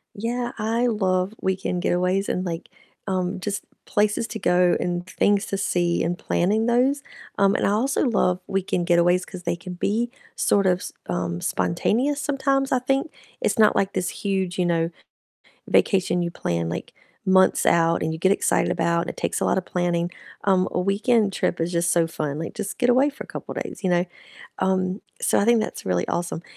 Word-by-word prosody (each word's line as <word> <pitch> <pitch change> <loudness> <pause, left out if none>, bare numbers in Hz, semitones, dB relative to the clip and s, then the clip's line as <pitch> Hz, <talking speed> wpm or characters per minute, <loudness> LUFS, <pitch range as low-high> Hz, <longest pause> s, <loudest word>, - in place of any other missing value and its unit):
Yeah, 240 +3 -2
I 225 +3 +1
love 190 -3 0
weekend 185 -1 -1
getaways 180 +2 +1
and, 185 - -1
like, 165 -2 -5 0.4
um, 185 -1 -1
just 200 +2 -3 0.2
places 210 +2 +1
to 220 0 -6
go 180 -2 +3
and 175 0 -2
things 200 +2 +2
to 195 - -2
see 175 -2 +1
and 175 +2 -1
planning 210 +7 +1
those, 255 +4 +2 0.4
um, 200 0 +4
and - - +1
I 200 - +2
also 255 +9 +1
love 185 -7 +2
weekend 185 -2 -1
getaways 175 +1 +3
'cause 180 -1 -9
they - - -1
can 180 +1 -8
be 215 +7 0 0.3
sort 200 -1 +2
of 180 -1 +3
s - - -7 0.2
um, 90 -1 -2
spontaneous 230 - 0
sometimes, 275 -1 0
I 255 - +3
think, 270 +4 0 0.3
it's - - 0
not 215 -1 +5
like 195 - +1
this 180 - -1
huge, 190 -3 -2
you 180 - +1
know, 165 -1 +1 0.8
vacation 185 -2 +2
you 170 0 -2
plan, 85 - -2
like, 85 - -5 0.3
months 190 0 +4
out 165 0 +3
and 160 - -1
you 160 - -4
get 190 +4 +3
excited - - +2
about 170 0 +1
and - - -4
it - - -21
takes - - -1
a - - 0
lotta 190 - +2
planning, 175 -1 -1 0.4
um, 190 -2 +3
a - - -1
weekend 205 +3 +2
trip 180 -2 -1
is 170 - -1
just 170 0 +1
so 170 -2 +3
fun, 150 -2 -3
like, 165 - -5
just 205 -2 -4
get 245 - +3
away 260 +4 +4
for 285 - -9
a - - -14
couple - - -7
days, - - -6
you 185 - +1
know? 175 0 +3 0.6
Um, 185 +1 0 0.2
so - - +2
I 200 - +2
think 235 0 +5
that's 215 - -4
really 90 -1 0
awesome, 175 -1 -2
185 Hz, 195 wpm, -24 LUFS, 175-215 Hz, 0.8 s, not